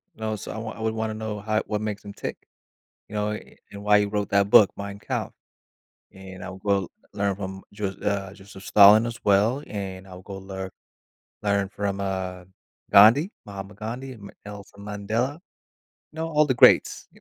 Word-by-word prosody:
You - - -23
know, 110 0 -1
so 105 - -7
I - - -6
wou 110 0 -5
I - - -11
would 110 0 0
wanna 110 0 -2
know 110 -1 -4
how 110 +1 0
what 105 - -1
makes 105 -1 -4
him 100 - -8
tick, - - -5 0.7
you 105 - -11
know, 105 0 0
a - - -2
a - - -14
and 100 0 -9
why 105 0 +6
he 105 - +1
wrote 105 0 -2
that 100 0 +3
book, 100 -1 +7
Mein 100 0 -6
Kampf, - - -4 0.8
and 95 -1 -11
I - - -6
will 95 0 -1 0.2
learn 100 -1 -1
from 95 -1 -6
Jos 100 -2 -4
uh, 100 -2 -1
Joseph 95 -1 -13
Stalin 105 +3 +7
as 120 0 -4
well, 105 +7 +3
and 95 -2 -6
I'll 90 0 -11
go 100 0 -8
lear 95 -1 -7 0.7
learn 100 -1 +1
from, 100 0 -3
uh, 95 -2 -3 0.5
Gandhi, 120 - +7
Mahatma 100 0 -8
Gandhi, 120 +5 -6
Ma 100 -2 -11 0.2
Nelson 100 0 -10
Mandela, 110 +8 -2 0.7
know 160 +1 -4
all 150 -1 +4
the 130 - +1
greats. 125 - +5
100 Hz, 190 wpm, -25 LUFS, 100-110 Hz, 0.8 s, book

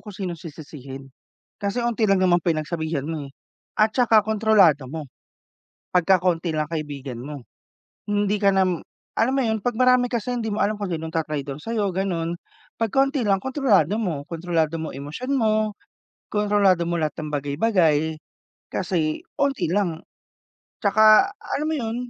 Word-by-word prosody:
kung 210 -3 -10
sinong 175 -4 -4
sisisihin. 140 -4 -10 0.5
Kasi 200 +4 -2
unti 225 -3 +1
lang 195 - +4
naman 175 -1 +4
pinagsabihan 160 -2 -1
mo, 155 -4 -4
eh. - - -14 0.5
At 215 +1 +3
saka 225 -4 +4
kontrolado 205 - +3
mo, 155 -2 -5 0.9
pagka 185 +1 +4
konti 175 -2 +1
lang 155 0 0
kaibigan 140 -6 -5
mo. 140 -2 -8 0.7
Hindi 205 0 +1
ka 200 -1 +5
nam 185 -3 +2 0.4
alam 245 +4 +2
mo - - +3
yun? 220 -1 0
'Pag 245 +2 -1
marami 250 -1 +4
kasi, 245 +1 -2
hindi 225 -2 -2
mo 215 - -1
alam 210 +2 +1
kung 200 -3 -4
sinong 160 0 -5
ta-traydor 145 -4 -3
sayo, 215 -1 -1
gano'n. 175 -3 -2 0.4
'Pag 225 -1 0
kaunti 275 0 +2
lang, 195 -2 +2
kontrolado 225 - +2
mo. 165 -10 -2
Kontrolado 165 -1 -1
mo 160 - -5
emosyon 150 - -5
mo, 215 -4 +1 0.6
kontrolado 205 -4 +2
mo 170 - -1
lahat 155 -1 -1
ng 155 -1 -5
bagay-bagay, 155 +1 +1 0.6
kasi 165 -4 -1 0.2
unti 270 - +1
lang. 180 -4 -1 0.8
Tsaka 215 - +6
alam 300 - -3
mo 320 - 0
yun 225 -2 -3
185 Hz, 155 wpm, -23 LUFS, 155-215 Hz, 0.9 s, Tsaka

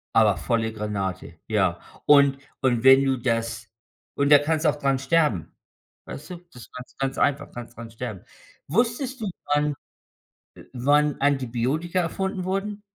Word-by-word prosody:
Aber 105 -5 +4
volle 115 +2 -1
Granate. 100 -6 -4
Ja, 95 -6 +1 0.3
und 140 -2 +5 0.2
und 120 -4 +1
wenn 135 +1 +7
du 135 -1 +1
das 115 -1 -2 0.5
und 140 0 +1
da 145 - +10
kannst 155 +2 -1
du - - +6
auch - - 0
dran 135 -2 0
sterben. 135 - +1 0.6
Weißt 150 - -9
du, 180 - -5
das 125 -6 -13
ganz 125 0 -11
ganz 135 0 -3
einfach. 145 0 0
Kannst 120 0 -9
dran 115 0 -9
sterben. 115 -4 -7 0.4
Wusstest 240 - -1
du 215 - -2 0.3
wann 150 0 +1 0.8
äh, - - -13
wann 145 +3 +2
Antibiotika 140 +5 0
erfunden 190 +2 -3
wurden? 200 +2 -3
135 Hz, 155 wpm, -24 LUFS, 115-150 Hz, 0.8 s, da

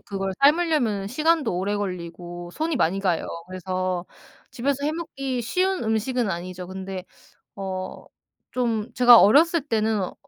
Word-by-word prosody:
그걸 195 -1 -4
삶으려면은 280 - +3
시간도 305 - +1
오래 200 +3 -1
걸리고 175 -2 -6
손이 320 - -1
많이 195 -4 +1
가요. 180 -4 0 0.2
그래서 185 -1 -3 0.5
집에서 280 +3 -1
해 300 - +1
먹기 275 -6 -4
쉬운 370 +10 0
음식은 225 +1 0
아니죠. 180 +1 -5
근데 190 0 -6 0.5
어 190 -1 -5 0.5
좀 235 -2 -1
제가 245 -2 +8
어렸을 320 - +5
때는 220 -7 0
215 Hz, 285 characters per minute, -24 LUFS, 185-275 Hz, 0.5 s, 제가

